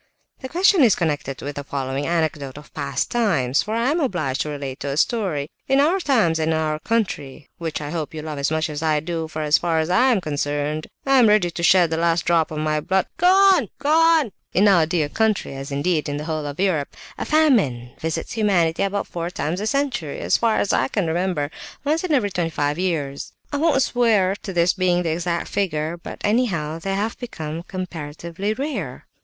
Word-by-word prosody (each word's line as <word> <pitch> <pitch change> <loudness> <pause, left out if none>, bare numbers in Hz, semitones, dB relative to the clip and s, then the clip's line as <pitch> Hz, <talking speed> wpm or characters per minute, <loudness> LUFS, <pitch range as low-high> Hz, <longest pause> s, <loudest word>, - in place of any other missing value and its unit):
"The 260 - -7
question 370 +2 +4
is 235 -7 +6
connected 145 -5 -2
with 145 +1 -5
the 145 - -4
following 135 0 -3
anecdote 155 -5 -1
of 150 - -13
past 140 -3 -2
times; 145 - +2
for 215 +1 -3
I 235 +4 +1
am 330 - +1
obliged 175 - -1
to 150 - -2
relate 140 -3 -5
a 140 0 -2
story. 170 - 0 0.2
In 270 +1 +3
our 325 +7 +3
times, 220 - +2
and 160 0 +1
in - - +1
our 155 -1 -1
country, 155 -10 -2
which 165 -2 -3
I 145 0 -5
hope 160 -2 -4
you 155 - -5
love 155 -2 -5
as 140 - +1
much 160 +1 0
as 150 -1 -5
I 155 -2 +2
do, 160 +1 -3
for 155 0 -4
as 150 0 +4
far 170 -2 0
as 160 +2 0
I 245 +8 +4
am 240 -6 +3
concerned, 145 -1 -2 0.2
I 270 -1 +5
am 235 - +6
ready 210 -5 +3
to 170 - -5
shed 170 -1 +5
the 160 - 0
last 170 -1 +1
drop 165 -2 +2
of 155 - -6
my 155 0 0
blood... 190 +4 +1
"Go 355 +2 +3
on! 380 - +5
Go 285 +1 -1
on!" 325 -6 +4 0.2
"In 200 +3 +5
our 175 -6 +5
dear 160 -3 0
country, 220 +3 0
as 135 +1 -7
indeed 150 +2 0
in 145 - -2
the 150 - -5
whole 155 -2 -3
of 145 +3 -7
Europe, 180 -7 0 0.2
a - - -1
famine 210 - +2
visits 160 0 -3
humanity 185 -7 +1
about 200 +1 0
four 170 0 -4
times 175 +1 -3
a 215 - -1
century, 270 - -1
as - - +1
far 230 -2 +2
as 200 - +1
I 130 - +2
can 195 +6 -1
remember; 165 -3 -1 0.3
once 310 +4 0
in 365 - -2
every 235 -9 +2
twenty 175 -2 -1
five 145 0 -1
years. 150 -7 -2 0.2
I - - +1
won't 295 -3 +3
swear 215 -7 +2
to 195 - -5
this 175 0 +2
being 180 -2 +1
the 165 - -1
exact 170 +1 -2
figure, 160 -4 -1
but 175 - -9
anyhow 180 -9 0
they 195 +3 -2
have 215 +3 -2
become 160 -9 -5
comparatively 170 +2 -5
rare." 220 - -4
170 Hz, 220 wpm, -22 LUFS, 150-215 Hz, 0.3 s, is